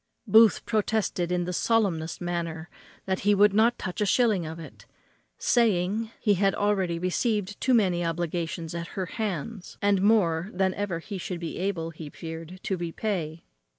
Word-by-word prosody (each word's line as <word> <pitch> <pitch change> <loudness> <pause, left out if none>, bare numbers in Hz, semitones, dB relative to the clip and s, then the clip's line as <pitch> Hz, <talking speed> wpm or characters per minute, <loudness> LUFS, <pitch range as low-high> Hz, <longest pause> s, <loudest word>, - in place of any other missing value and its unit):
Booth 220 -1 +5
protested 210 -5 0
in 180 0 +1
the 180 - -3
solemnest 185 -7 0
manner 170 -2 -4 0.3
that 190 -1 -1
he 205 +1 +3
would 205 0 +5
not 225 +3 +4
touch 185 +2 -5
a - - +3
shilling 210 -8 +2
of 160 +1 -6
it, 165 - -12 0.5
saying, 220 -1 +2
he 210 - +3
had 195 +1 +2
already 195 -4 +1
received 205 +3 -1
too 260 -1 +3
many 185 -6 +2
obligations 170 0 -3
at 170 0 -4
her 190 - 0
hands, 205 0 -5
and 200 -2 +2
more 190 -5 +3
than 190 0 +1
ever 200 -4 -2
he 190 +4 -6
should 180 0 -4
be 170 0 -5
able, 180 -4 -2
he 155 -2 -9
feared, 165 +3 -8
to 190 - -1
repay. 170 -2 -3
185 Hz, 165 wpm, -27 LUFS, 170-205 Hz, 0.5 s, Booth